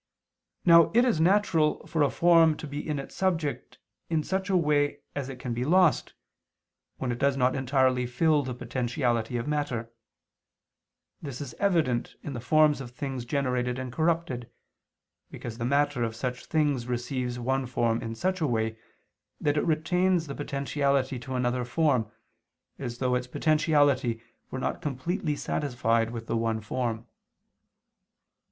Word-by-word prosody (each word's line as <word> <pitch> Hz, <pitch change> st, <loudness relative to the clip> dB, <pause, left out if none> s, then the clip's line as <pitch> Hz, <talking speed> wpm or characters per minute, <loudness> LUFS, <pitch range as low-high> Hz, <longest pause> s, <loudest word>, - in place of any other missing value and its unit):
Now 170 Hz, -2 st, +7 dB
it 240 Hz, +2 st, +6 dB
is 225 Hz, -11 st, +2 dB
natural 170 Hz, -4 st, +2 dB
for 160 Hz, -2 st, -1 dB
a 145 Hz, -, +4 dB
form 165 Hz, -1 st, +4 dB
to -, -, -7 dB
be 145 Hz, +2 st, -5 dB
in 150 Hz, -, -1 dB
its 135 Hz, -, -7 dB
subject 170 Hz, -6 st, -2 dB, 0.3 s
in 160 Hz, -2 st, +1 dB
such 190 Hz, +3 st, -2 dB
a 190 Hz, -, +4 dB
way 150 Hz, -3 st, +2 dB, 0.2 s
that 140 Hz, -2 st, -4 dB
it 135 Hz, -, -7 dB
can 125 Hz, -1 st, -4 dB
be 120 Hz, +1 st, -2 dB
lost, 170 Hz, -1 st, +3 dB, 0.8 s
when 130 Hz, -2 st, -2 dB
it 120 Hz, -, -4 dB
does 140 Hz, -1 st, +2 dB
not 130 Hz, 0 st, +2 dB
entirely 130 Hz, -1 st, +2 dB
fill 150 Hz, +5 st, +2 dB
the 130 Hz, -3 st, -5 dB
potentiality 120 Hz, -2 st, -1 dB
of 115 Hz, -, -4 dB
matter: 135 Hz, -6 st, -2 dB, 1.3 s
this 140 Hz, -5 st, -6 dB
is 140 Hz, -4 st, -6 dB
evident 160 Hz, -12 st, +1 dB
in 145 Hz, -, -5 dB
the 120 Hz, -, -4 dB
forms 150 Hz, +3 st, +3 dB
of 125 Hz, -, -7 dB
things 130 Hz, 0 st, -5 dB
generated 125 Hz, -2 st, -1 dB
and 130 Hz, -2 st, -5 dB
corrupted, 160 Hz, -6 st, -1 dB, 0.8 s
because 115 Hz, 0 st, -8 dB
the 115 Hz, -, -1 dB
matter 140 Hz, 0 st, +1 dB
of 115 Hz, -1 st, -2 dB
such 125 Hz, +1 st, -4 dB
things 145 Hz, -6 st, +1 dB
receives 125 Hz, 0 st, -2 dB
one 130 Hz, +2 st, -1 dB
form 120 Hz, -2 st, 0 dB
in 115 Hz, -1 st, -5 dB
such 185 Hz, +6 st, -1 dB
a 155 Hz, -, +2 dB
way, 110 Hz, -2 st, -1 dB, 0.6 s
that 145 Hz, -1 st, +1 dB
it 150 Hz, -, +1 dB
retains 175 Hz, +2 st, +2 dB
the 140 Hz, -, -6 dB
potentiality 140 Hz, -2 st, -1 dB
to 130 Hz, +2 st, -6 dB
another 125 Hz, 0 st, 0 dB
form, 125 Hz, -3 st, +1 dB, 0.7 s
as 120 Hz, -3 st, -5 dB
though 125 Hz, 0 st, 0 dB
its 125 Hz, 0 st, -1 dB
potentiality 145 Hz, -5 st, +2 dB, 0.3 s
were -, -, -5 dB
not 130 Hz, -, -2 dB
completely 150 Hz, +2 st, -2 dB
satisfied 115 Hz, -6 st, 0 dB
with 115 Hz, -1 st, -6 dB
the 115 Hz, -, -2 dB
one 115 Hz, -1 st, 0 dB
form. 115 Hz, 0 st, -3 dB
135 Hz, 160 wpm, -27 LUFS, 120-155 Hz, 1.3 s, Now